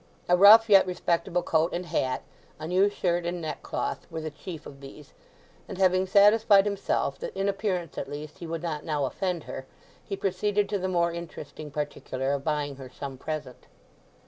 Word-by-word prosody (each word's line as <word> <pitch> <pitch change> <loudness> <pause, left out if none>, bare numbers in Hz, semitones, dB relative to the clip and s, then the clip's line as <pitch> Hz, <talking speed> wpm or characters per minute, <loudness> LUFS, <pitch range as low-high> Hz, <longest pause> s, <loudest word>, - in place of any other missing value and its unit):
A 180 - +5
rough 210 +4 +8
yet 195 -3 +6
respectable 175 -1 0
coat 165 +1 +1
and 180 +1 -3
hat, 130 -5 -1 0.4
a 155 - -6
new 185 +4 +3
shirt 175 -3 -1
and 175 +1 -3
neck 155 -3 -5
cloth, - - -4
were 160 - -5
the 155 0 -5
chief 160 +2 -9
of 140 -1 -11
these; 140 +2 -12 0.6
and 195 - -6
having 185 0 +3
satisfied 205 +1 +6
himself 200 -1 -1
that - - -6
in 195 - 0
appearance 195 -5 -2
at 135 - -5
least 150 +1 -8
he 170 - -7
would 165 0 -4
not 155 -3 -3
now 150 -4 -1
offend 180 +3 -2
her, 130 - -8 0.4
he 195 - -5
proceeded 200 +1 0
to 205 - -1
the 185 - -2
more 170 -2 +1
interesting 155 -3 -8
particular 140 -2 -3
of 140 -1 -2
buying 145 -2 -2
her 130 -2 -9
some 135 +1 -7
present. 145 -2 -6
170 Hz, 190 wpm, -27 LUFS, 150-195 Hz, 0.6 s, rough